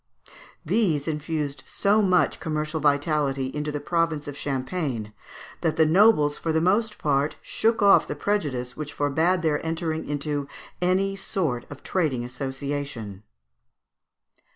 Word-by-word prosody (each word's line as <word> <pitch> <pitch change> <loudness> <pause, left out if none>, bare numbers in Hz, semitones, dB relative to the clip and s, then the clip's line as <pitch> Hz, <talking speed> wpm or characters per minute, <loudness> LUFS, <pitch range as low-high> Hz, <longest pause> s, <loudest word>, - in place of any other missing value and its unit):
These 165 -7 +1
infused 150 -2 -2
so 205 +2 +2
much 185 -3 +2
commercial 155 0 -2
vitality 145 -2 +1
into 150 0 -2
the 145 - -3
province 165 -1 0
of 145 - -5
Champagne, 130 -5 -3 0.5
that 160 -2 +1
the 160 - +4
nobles 155 -4 +4
for 165 - -1
the 160 - +2
most 210 +6 +1
part 145 0 +1
shook 225 -1 0
off 200 - +6
the - - -3
prejudice 145 -9 -2
which 150 -1 -6
forbad 160 +5 +1
their 150 -2 +1
entering 160 -1 -2
into 145 -1 -2 0.3
any 190 +2 +2
sort 160 -10 -2
of 140 - -10
trading 145 -10 0
association. 130 -5 -4
150 Hz, 130 wpm, -25 LUFS, 140-175 Hz, 0.5 s, off